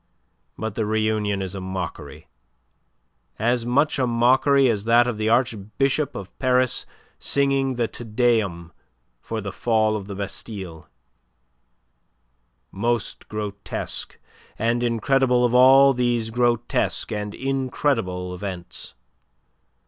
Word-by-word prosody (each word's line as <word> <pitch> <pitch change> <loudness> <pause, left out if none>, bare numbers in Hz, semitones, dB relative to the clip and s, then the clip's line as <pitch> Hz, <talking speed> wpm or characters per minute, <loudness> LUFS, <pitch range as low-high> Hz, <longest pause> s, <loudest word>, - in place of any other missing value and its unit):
But 110 -1 -4
the 110 0 -2
reunion 110 -2 0
is 95 - -6
a 95 - -5
mockery 95 -3 -6 1.1
as 120 +1 0
much 140 +4 +2
a 130 - +2
mockery 130 +4 +4
as 105 -3 0
that 120 +1 +5
of 120 -3 -3
the 110 0 +1
Archbishop 130 +5 0
of 95 -1 -8
Paris 130 -1 +2 0.3
singing 135 -1 +1
the 120 -1 0
Te 120 - -9
Deum 105 -7 0 0.5
for 115 -1 -4
the 100 -1 -5
fall 110 +1 +1
of 100 -2 -5
the 100 - -6
Bastille 95 -3 -5 1.8
most 115 +3 -2
grotesque 105 -1 -5 0.4
and 115 +2 0
incredible 125 +2 +2
of 120 - 0
all 135 +2 +7
these 120 -2 0
grotesque 120 0 0
and 105 -1 -4
incredible 125 -9 -1
events. 90 -1 -7
115 Hz, 115 wpm, -23 LUFS, 100-125 Hz, 1.8 s, all